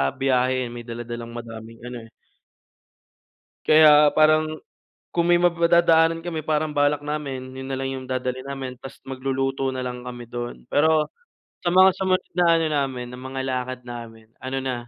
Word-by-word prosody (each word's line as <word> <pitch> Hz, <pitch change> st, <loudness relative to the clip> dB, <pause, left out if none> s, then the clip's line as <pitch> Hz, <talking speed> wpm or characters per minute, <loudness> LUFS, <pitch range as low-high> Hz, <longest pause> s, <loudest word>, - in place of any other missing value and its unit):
biyahe 130 Hz, -1 st, +1 dB
yon 120 Hz, -, -6 dB
may 120 Hz, -, -10 dB
dala-dalang 120 Hz, 0 st, -6 dB
madaming 115 Hz, -1 st, -9 dB
ano 125 Hz, 0 st, -6 dB
eh. -, -, -24 dB, 1.6 s
Kaya 150 Hz, -1 st, +7 dB
parang 155 Hz, 0 st, +5 dB, 0.7 s
kung 170 Hz, -1 st, +2 dB
may 175 Hz, 0 st, +5 dB
madadaanan 170 Hz, -1 st, +3 dB
kami 165 Hz, -2 st, -4 dB
parang 155 Hz, 0 st, 0 dB
balak 145 Hz, 0 st, +1 dB
namin 140 Hz, -3 st, -4 dB
yun 130 Hz, 0 st, -7 dB
nalang 135 Hz, 0 st, -3 dB
yung 130 Hz, -, -9 dB
dadalhin 130 Hz, 0 st, -3 dB
namin 130 Hz, -2 st, -6 dB
tas 135 Hz, -, -11 dB
magluluto 135 Hz, 0 st, -2 dB
nalang 125 Hz, -1 st, -5 dB
kami 120 Hz, -1 st, -7 dB
dun, 120 Hz, 0 st, -5 dB
pero 155 Hz, +1 st, +3 dB, 0.6 s
sa 175 Hz, -, +2 dB
mga 185 Hz, +1 st, +8 dB
sumunod 185 Hz, -1 st, +1 dB
na 175 Hz, -, +4 dB
ano 165 Hz, -, +1 dB
namin 135 Hz, -4 st, -1 dB
na 125 Hz, -, -9 dB
mga 130 Hz, +1 st, -5 dB
lakad 130 Hz, -1 st, -3 dB
namin 115 Hz, -2 st, -9 dB
ano 130 Hz, +1 st, -5 dB
na 130 Hz, -1 st, -2 dB
135 Hz, 155 wpm, -23 LUFS, 125-155 Hz, 1.6 s, mga